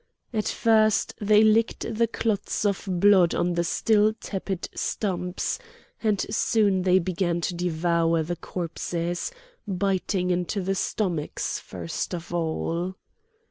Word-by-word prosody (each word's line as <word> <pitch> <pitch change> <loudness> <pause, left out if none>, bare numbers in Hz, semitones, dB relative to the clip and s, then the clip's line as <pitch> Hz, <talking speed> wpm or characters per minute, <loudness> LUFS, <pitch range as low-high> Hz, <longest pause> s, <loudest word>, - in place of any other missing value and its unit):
At 215 -2 0
first 220 -2 +3
they 210 +1 +5
licked 220 +1 +3
the 230 +1 +3
clots 215 -2 -1
of 200 -1 0
blood 185 -1 +5
on 175 0 +1
the 170 0 +1
still 215 +5 +3
tepid 190 -2 -4
stumps; 180 -3 -2 0.4
and 215 -3 +1
soon 205 -4 +2
they 185 0 +4
began 175 -1 0
to 175 - -1
devour 170 -1 +1
the 175 +3 -3
corpses, 170 - -3 0.4
biting 190 -1 0
into 180 +3 -1
the 195 +1 -1
stomachs 180 -5 -2
first 90 - -5
of 170 0 -8
all. 170 +2 -2
185 Hz, 125 wpm, -26 LUFS, 175-205 Hz, 0.4 s, they